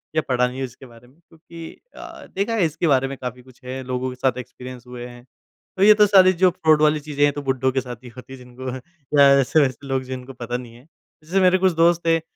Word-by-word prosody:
या 155 - +3
पढ़ा 125 0 +2
नहीं 125 +2 -8
हो 135 - -2
इसके 130 +2 -13
बारे 120 0 -17
में 130 - -24
क्योंकि 165 0 -12 0.2
अ, - - -11
देखा 205 +4 -1
है 200 -7 +2
इसके 160 +2 -2
बारे 135 -2 +2
में 135 0 -7
काफ़ी 125 0 -7
कुछ 125 0 -21
है, 130 +1 -5
लोगों 130 0 -3
के 125 - -8
साथ 130 -1 -1
एक्सपीरियंस 125 0 -9
हुए 125 -1 -8
हैं। 120 0 -13 0.5
तो 190 - +2
ये 215 +1 +8
तो 210 0 +5
सारी 190 -2 +6
जो 180 +1 +3
फ्रॉड 160 -4 +2
वाली 150 0 +3
चीजें 145 -1 -2
हैं 145 - +4
तो 145 - -5
बुड्ढों 130 -1 0
के 130 0 -1
साथ 125 -1 -8
ही 125 - -10
होती 125 +1 -11
है - - -9
जिनको 125 +1 -8 0.5
या 140 -1 +8
ऐसे-वैसे 135 -1 +1
लोग 135 -1 -1
जिनको 130 0 -8
पता 120 0 -5
नहीं 120 -2 -11
है। 125 +4 -18 0.4
जैसे 180 +5 0
मेरे 185 0 +4
कुछ 185 0 +2
दोस्त 170 +1 +2
हैं 165 -1 +3
135 Hz, 255 wpm, -21 LUFS, 125-165 Hz, 0.5 s, ये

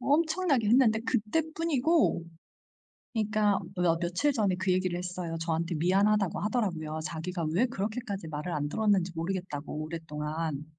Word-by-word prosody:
엄청나게 315 - +2
했는데 230 -2 +5
그때뿐이고 305 - +1 0.9
그러니까 215 -2 +2 0.2
뭐 180 -1 0
어 165 - 0
며칠 180 +12 +1
전에 205 -7 +1
그 185 +1 0
얘기를 185 -1 +1
했어요. 180 -2 -4
저한테 165 +1 -1
미안하다고 195 +4 +2
하더라고요. 175 -7 -1
자기가 165 +2 -3
왜 230 +8 +4
그렇게까지 205 -4 -4
말을 155 +3 -4
안 145 0 -1
들었는지 200 -3 +2
모르겠다고 165 -3 -3
오랫동안. 155 -1 -4
185 Hz, 375 characters per minute, -29 LUFS, 165-220 Hz, 0.9 s, 했는데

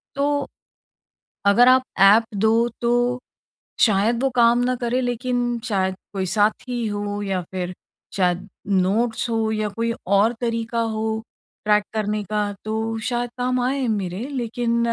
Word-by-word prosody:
तो 285 0 0 1.0
अगर 220 +5 +6
आप 255 0 +6 0.2
ऐप 205 +4 +7
दो 225 +3 +3
तो 245 +1 +1 0.6
शायद 220 +3 +3
वो 270 - +3
काम 235 -1 +5
ना 255 0 +1
करे 240 +2 +1
लेकिन 245 -1 -1
शायद 190 -5 0 0.2
कोई 190 -1 -2
साथी 220 +4 0
हो 205 0 -3
या 195 -2 -1
फिर 180 -1 -3 0.4
शायद 185 +1 0 0.2
नोट्स 205 +5 +1
हो 225 -1 0
या 215 -1 -1
कोई 230 +3 -2
और 200 +4 +4
तरीका 230 -1 -1
हो 220 0 -2 0.4
ट्रैक 210 -1 +3
करने 210 -1 -1
का 210 0 -1
तो 220 +1 -2
शायद 240 -1 -1
काम 250 0 0
आए 260 +1 0
मेरे 200 +1 -2
लेकिन 240 -3 -1
225 Hz, 140 wpm, -22 LUFS, 205-245 Hz, 1.0 s, ऐप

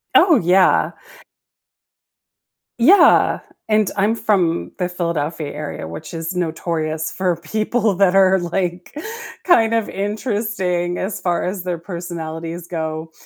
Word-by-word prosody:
Oh, 345 -5 +6
yeah. 180 +1 +3 1.9
Yeah, 335 +13 +6 0.3
and 215 -2 +2
I'm 205 +3 +2
from 180 -7 0
the 180 -1 0
Philadelphia 165 -3 -3
area, 150 - -6
which 85 - -8
is 165 +2 -4
notorious 160 -2 -2
for 185 -2 0
people 215 +6 0
that 190 0 +3
are 190 0 +5
like 175 0 -3 0.5
kind 230 -11 +4
of 225 -2 0
interesting 200 -4 -2
as 195 +2 -3
far 175 -2 0
as 185 0 -3
their 180 -1 -2
personalities 170 -1 -6
go, 160 -1 -4
180 Hz, 120 wpm, -20 LUFS, 165-200 Hz, 1.9 s, Oh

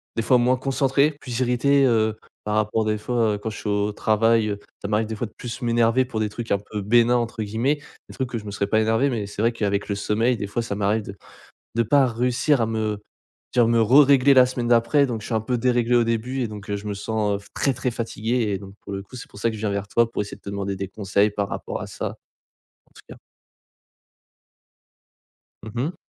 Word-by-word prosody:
des 115 - -1
fois 125 0 +4
moins 125 +1 +3
concentré, 135 +2 +2
plus 125 0 -4
irrité, 135 +3 +3
heu, 110 -3 +2 0.3
par 105 0 -2
rapport 110 +1 +1
des 105 0 0
fois, 115 -1 0
heu, - - -4
quand 110 +2 -5
je - - -8
suis 105 - -4
au 105 +1 0
travail, 110 +1 +2
heu, 100 0 -3 0.2
ça 100 - -4
m'arrive 105 +1 0
des 110 - -4
fois 115 +1 -3
de 110 - -21
plus 120 +1 -6
m'énerver 120 +1 +2
pour 115 -4 -4
des 105 -1 0
trucs 115 +1 -7
un 100 - +3
peu 105 0 -6
bénins 120 +4 +4
entre 115 -2 -2
guillemets, 120 +8 0 0.3
des - - -10
trucs 130 -2 -2
que 120 - -3
je 105 - -13
me 100 - -6
serais 100 0 -2
pas 110 +1 +2
énervé, 115 +5 +2
mais 105 -4 -3
c'est 100 +1 -5
vrai 115 - +3
qu'avec 100 -2 -1
le 100 - 0
sommeil 110 +4 +1
des 100 - -4
fois 120 +4 -2
ça 100 -3 -4
m'arrive 105 +1 0
de 100 - -8 0.6
de 115 - +3
pas 135 +4 +4
réussir 125 +3 +1
à - - +1
me 110 -2 -2 0.6
dire, 120 -2 +4
me 115 -1 +3
rerégler 140 +3 +6
la 130 -1 +7
semaine 125 -2 -3
d'après 120 +4 +4
donc 115 -3 -4
je - - -8
suis 115 - -3
un 110 - +2
peu 125 +1 -1
déréglé 120 0 +2
au 120 - +4
début 115 +3 -2
et 115 - -2
donc, 105 -1 -9
heu, 100 - 0
je 105 +1 -8
me 105 - -2
sens, 105 0 -1
heu, - - -2
f 100 - -17
très 135 -2 +1
très 125 +1 -2
fatigué 115 0 -1
et 95 - -1
donc 95 0 -11
pour 100 - -8
le 95 - -4
coup 100 - -17
c'est - - -9
pour 100 - -13
ça 115 - +1
que 110 - -6
je - - -8
viens 110 - -1
vers 100 0 -2
toi 115 +1 +2
pour 105 - -2
essayer 105 - -8
de - - -35
te - - -9
demander 100 -1 -3
des 95 0 -4
conseils 100 +1 +1
par 100 -1 -2
rapport - - -5
à - - -6
ça - - -4 0.8
en - - -32
tout - - -14
cas. - - -9 2.5
Mmh 110 -1 -9
mh. 165 0 -6
115 Hz, 255 wpm, -23 LUFS, 105-125 Hz, 2.5 s, la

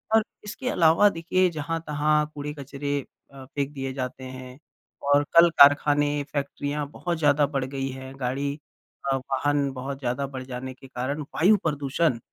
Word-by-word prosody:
और 220 - +5 0.2
इसके 230 +5 -4
अलावा 170 +2 +5
देखिए 180 +1 +1
जहाँ-तहाँ 150 -1 0
कूड़े 150 +1 -4
कचरे 140 +1 -3 0.3
अ, 135 -1 -10
फेंक 140 +1 -3
दिए 135 -1 -4
जाते 130 0 -5
हैं। 130 0 -9 0.5
और 145 0 +5
कल 170 0 +9
कारखाने 145 0 +5
फैक्ट्रियाँ 145 0 -2
बहुत 170 +2 -3
ज़्यादा 145 -1 +4
बढ़ 135 -3 -2
गई 135 0 -3
हैं, 130 0 -8
गाड़ी 140 +3 -2 0.5
अ, 135 - +3
वाहन 140 +1 0
बहुत 135 +1 -5
ज़्यादा 125 +1 -1
बढ़ 130 -1 -7
जाने 130 0 -6
के 135 +1 -15
कारण 130 +4 -3
वायु 205 +6 +5
प्रदूषण 145 -2 0
145 Hz, 155 wpm, -25 LUFS, 135-150 Hz, 0.5 s, कल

